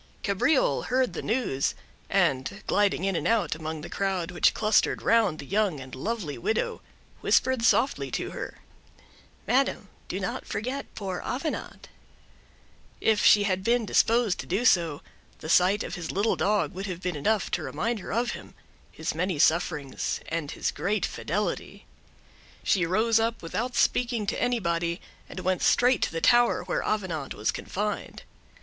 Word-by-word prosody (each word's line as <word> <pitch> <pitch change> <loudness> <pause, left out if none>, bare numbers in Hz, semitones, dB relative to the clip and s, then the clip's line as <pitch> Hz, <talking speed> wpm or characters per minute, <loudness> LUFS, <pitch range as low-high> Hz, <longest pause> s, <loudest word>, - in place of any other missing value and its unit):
Cabriole 225 - +2
heard 255 0 +1
the - - -4
news, 215 - 0 0.3
and, 135 +11 +1
gliding 205 -3 +2
in 195 -1 0
and 165 - -1
out 225 -3 +2
among 155 0 -5
the 170 - -7
crowd 190 -3 -2
which 175 - +3
clustered 215 0 +2
round 220 -8 +3
the 140 - -8
young 195 -3 0
and 130 -1 -10
lovely 170 - -4
widow, 220 - -1 0.4
whispered 260 -2 +2
softly 240 +3 +2
to - - -3
her—"Madam, 270 +2 -4 0.2
do - - -3
not - - -4
forget 255 +6 -3
poor 190 -4 -4
Avenant." 280 +6 -4 1.1
If 220 -1 +2
she 205 - +7
had 190 -2 0
been 235 +2 +2
disposed 225 -2 +2
to - - -6
do 200 +8 0
so, 170 -9 +3 0.3
the 155 - -8
sight 185 +5 +4
of - - -6
his 170 -2 -5
little 205 +4 +1
dog 205 -1 +1
would 190 +2 -5
have 180 -1 -6
been 180 -2 -2
enough 205 +9 0
to - - 0
remind 230 -1 -2
her - - -7
of 235 +3 0
him—his - - -8
many 180 +1 -1
sufferings, 155 -3 +1
and 160 -3 -3
his - - -2
great 205 +3 -1
fidelity. - - -3 0.8
She 180 -4 +2
rose 220 +5 +3
up, 225 -2 -1
without 240 +9 -3
speaking 235 -3 +1
to 200 - -2
anybody, 170 -7 0 0.3
and 185 - -6
went 185 0 0
straight 250 0 +4
to - - +1
the 165 0 -3
tower 240 0 +4
where - - -1
Avenant 180 -9 -2
was 105 - 0
confined. 210 +2 -4
200 Hz, 155 wpm, -27 LUFS, 170-230 Hz, 1.1 s, she